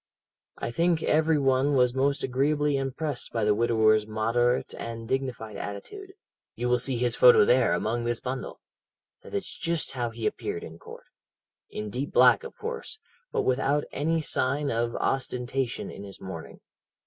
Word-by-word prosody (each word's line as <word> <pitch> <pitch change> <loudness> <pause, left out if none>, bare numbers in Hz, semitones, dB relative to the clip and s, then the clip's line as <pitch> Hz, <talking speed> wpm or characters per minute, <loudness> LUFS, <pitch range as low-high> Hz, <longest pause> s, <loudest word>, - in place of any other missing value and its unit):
"I - - -4
think 165 +4 +1
every 160 0 +3
one 135 +1 +2
was 125 -2 +3
most 140 +2 +1
agreeably 145 +3 +1
impressed 135 +1 -3
by 115 - -1
the 105 0 +4
widower's 110 -1 +3
moderate 115 +3 +1
and 115 -1 -6
dignified 125 -4 -3
attitude. 380 - -7 0.4
You 125 - -2
will 125 0 +3
see 125 0 -2
his 120 0 0
photo 125 -4 +7
there, 125 +1 +4
among 120 +2 -1
this 120 -1 -1
bundle. 130 +1 -5 0.6
That - - -9
is - - -2
just 170 -2 -1
how 120 -3 -2
he 115 -1 -6
appeared 85 - -2
in 80 +1 -10
court. - - -12 0.6
In 105 -1 -5
deep 130 +5 -3
black, - - +6
of 465 - -9
course, 455 -5 -5 0.3
but - - 0
without 135 +3 +1
any 160 +3 0
sign 140 0 0
of 115 0 -1
ostentation 125 -1 -2
in - - -9
his 100 -1 -10
mourning. 85 -4 -8
125 Hz, 160 wpm, -27 LUFS, 115-145 Hz, 0.6 s, photo